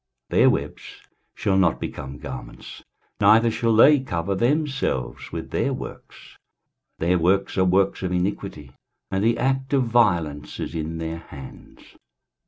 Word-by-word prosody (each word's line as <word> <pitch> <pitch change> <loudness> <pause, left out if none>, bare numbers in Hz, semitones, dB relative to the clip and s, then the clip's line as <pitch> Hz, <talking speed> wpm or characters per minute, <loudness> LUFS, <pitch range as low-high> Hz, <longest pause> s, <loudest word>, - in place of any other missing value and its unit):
23:059:006 - - +2
Their - - +7
webs - - -2 0.5
shall 95 -2 +1
not 90 -4 +2
become 70 +1 -6
garments, 65 -3 -9 0.4
neither 110 +3 +5
shall 115 0 +1
they 145 +6 +7
cover 95 -7 -2
themselves 130 - -1
with - - -6
their - - 0
works: - - -10 0.6
their 90 +2 +1
works 95 +4 +1
are 95 - +3
works 95 +2 +2
of 95 -1 -2
iniquity, 90 -6 -3 0.4
and 95 +1 0
the 115 +1 +2
act 135 +2 -1
of 135 -2 +3
violence 90 -11 +1
is - - -4
in 80 0 -4
their 80 0 -4
hands. 70 -4 -12
95 Hz, 145 wpm, -23 LUFS, 80-115 Hz, 0.6 s, Their